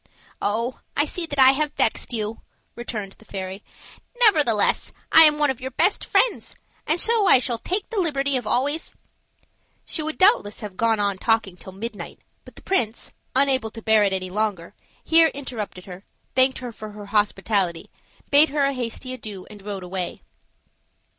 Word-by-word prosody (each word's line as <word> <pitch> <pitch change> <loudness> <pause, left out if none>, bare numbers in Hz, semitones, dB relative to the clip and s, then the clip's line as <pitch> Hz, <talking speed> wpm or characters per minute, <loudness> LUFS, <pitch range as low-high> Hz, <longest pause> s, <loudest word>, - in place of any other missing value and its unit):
"Oh! 230 +5 -1 0.2
I 290 - +3
see 335 +2 -4
that 285 - -5
I 265 -1 +8
have 295 +2 -1
vexed - - +1
you," 220 -1 -3 0.3
returned 220 -4 -5
the - - -17
fairy. 190 0 -6 0.6
"Nevertheless, 300 - +3 0.2
I 320 0 +9
am 300 -1 +4
one 295 -2 +3
of 260 -1 -8
your 260 - -4
best - - +1
friends, - - +1 0.3
and 320 +3 +1
so 445 -1 +3
I - - +8
shall 245 -2 -2
take 380 - -3
the 445 - -1
liberty 280 -5 0
of 245 -4 -2
always 285 +8 -1 0.4
" - - -41
She 320 - -2
would 310 +1 -4
doubtless 370 - +3
have 205 -3 -7
gone 225 +1 +1
on 200 -2 0
talking 225 -5 +1
till 190 - -12
midnight; 210 +2 -7 0.3
but - - -15
the - - -14
prince, 240 - -1 0.2
unable 265 -4 +2
to 225 - -10
bear 220 -1 +4
it 200 - +2
any 185 -1 -3
longer, 205 -4 -2 0.3
here 325 0 +5
interrupted 225 -9 -6
her, 185 0 -10 0.3
thanked 260 0 +3
her 250 -2 -6
for 215 -1 -10
her 205 0 -9
hospitality, 200 -4 0 0.4
bade 295 +2 +6
her 285 0 +1
a 275 - 0
hasty 255 0 -4
adieu, 210 -7 -8
and 205 -1 -12
rode 195 -2 -6
away. 180 0 -5
235 Hz, 180 wpm, -23 LUFS, 205-285 Hz, 0.6 s, I